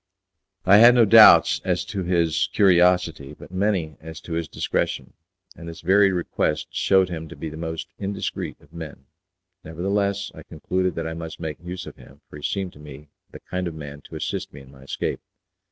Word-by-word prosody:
I 100 +2 +7
had 120 +3 +8
no 120 -2 +6
doubts 110 +1 +7
as 90 -1 -1
to 95 +1 -4
his 85 -3 +1
curiosity, 90 -6 +3
but - - -13
many 95 -6 -1
as 80 0 -9
to 85 - -7
his 85 -1 -2
discretion, - - -3 0.4
and 85 +1 -9
this 85 - -10
very 95 +3 +4
request 80 -4 -2
shewed 95 -1 +2
him 80 -2 -6
to - - -10
be 80 - -6
the 80 - -9
most 80 0 -5
indiscreet 100 0 -4
of - - -23
men. 80 -5 -9 0.6
Nevertheless, 100 +4 -2
I - - -11
concluded 95 0 -3
that 80 - -3
I 80 - -4
must 80 -1 -8
make 80 -3 -5
use 90 +1 -6
of - - -11
him, 70 +2 -17
for - - -11
he - - -11
seemed 95 +3 -3
to - - -16
me 75 0 -12 0.2
the - - -12
kind 90 0 -4
of 85 - -6
man 75 -2 -9
to - - -11
assist - - -4
me 70 - -12
in 65 0 -16
my 65 -1 -17
escape. 70 - -4
85 Hz, 200 wpm, -23 LUFS, 80-95 Hz, 0.6 s, had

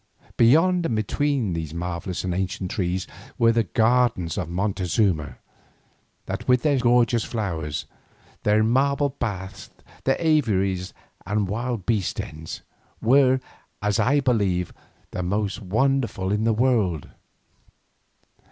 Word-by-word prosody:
Beyond 165 +8 +4
and 115 - -1
between 120 - 0
these 80 -1 -4
marvellous 90 +1 -4
and 90 -1 -1
ancient 95 0 -3
trees 90 0 -1 0.3
were 115 0 +5
the 115 -1 +1
gardens 115 -5 +2
of 90 -5 -3
Montezuma, 90 - 0 0.9
that - - -5
with 125 -1 +3
their 145 -3 +3
strange 125 - -4
and 120 +1 +6
gorgeous 120 -1 +2
flowers, 85 -10 -3 0.6
their 105 +1 +3
marble 140 +5 +2
baths, 100 -7 -5 0.4
their 135 - +2
aviaries 100 - +1 0.3
and 105 +1 -1
wild 115 0 -3
beast 105 -6 0
dens, 80 +1 -7 0.4
were, 130 +2 +4 0.4
as 105 0 0
I 140 +3 +3
believe, 100 -9 0 0.4
the - - -3
most 100 +3 -2
wonderful 115 -1 0
in 105 +2 0
the 115 - +3
whole - - -5
world. 100 - +1
105 Hz, 130 wpm, -24 LUFS, 90-125 Hz, 0.9 s, and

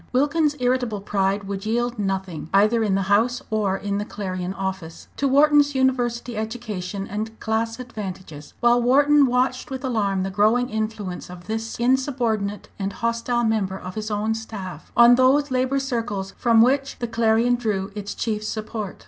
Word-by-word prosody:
Wilkins's 295 +2 +2
irritable 245 -4 0
pride 195 0 0
would 195 0 -5
yield 240 +1 -1
nothing, 190 -5 -3
either 215 +4 +4
in 200 -3 +1
the 195 - +1
House 220 +6 +2
or 205 -3 +1
in 200 0 -2
the - - -1
Clarion 185 -3 -4
office, 190 -4 -5
to 280 - +1
Wharton's 290 +1 +4
university 245 -2 0
education 215 -4 -4
and 220 +2 -5
class 225 +1 -1
advantages, 185 -11 -8
while 240 0 +4
Wharton 285 +3 +5
watched 255 +1 0
with 265 0 -5
alarm 205 -7 0
the 195 - -3
growing 220 +6 +2
influence 215 -5 -4
of 175 -1 -11
this 225 +2 -4
insubordinate 240 -5 0
and 195 0 -2
hostile 230 +1 -1
member 210 -4 0
of 185 0 -8
his 215 +1 -4
own 215 +1 0
staff 200 -7 -7
on 240 0 +8
those 265 +3 +3
labour 255 +1 +1
circles 230 -8 -3
from 230 -2 +4
which 270 +2 +1
the 240 - -3
Clarion 230 +1 +2
drew 210 -5 -1
its 205 -1 -6
chief 215 -3 -2
support. 215 -2 -5
220 Hz, 165 wpm, -23 LUFS, 200-245 Hz, -, on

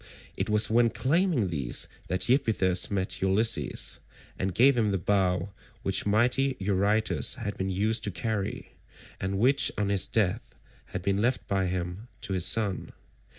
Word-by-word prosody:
It - - -3
was 105 0 +3
when 115 +1 +3
claiming 145 - 0
these 70 -7 0 0.2
that 90 +1 -1
Iphitus 110 -8 +2
met 95 -2 -3
Ulysses, 95 +4 +2 0.4
and 95 +1 -1
gave 135 +3 +5
him 110 -3 +1
the 100 - 0
bow 95 0 0 0.3
which 95 +1 0
mighty 125 +5 +1
Eurytus 100 +5 +1
had 110 -5 -5
been 95 0 -3
used 110 +4 0
to - - -2
carry, 100 +2 -4 0.5
and 95 +1 -3
which 130 +4 +3
on 105 -1 -1
his 100 -1 +2
death 105 -6 -1 0.3
had 90 - -7
been 100 +1 0
left 125 +3 -1
by 95 -1 0
him 90 +4 -5
to 95 - -4
his 90 -2 +2
son. 105 -4 0
100 Hz, 155 wpm, -27 LUFS, 95-115 Hz, 0.5 s, gave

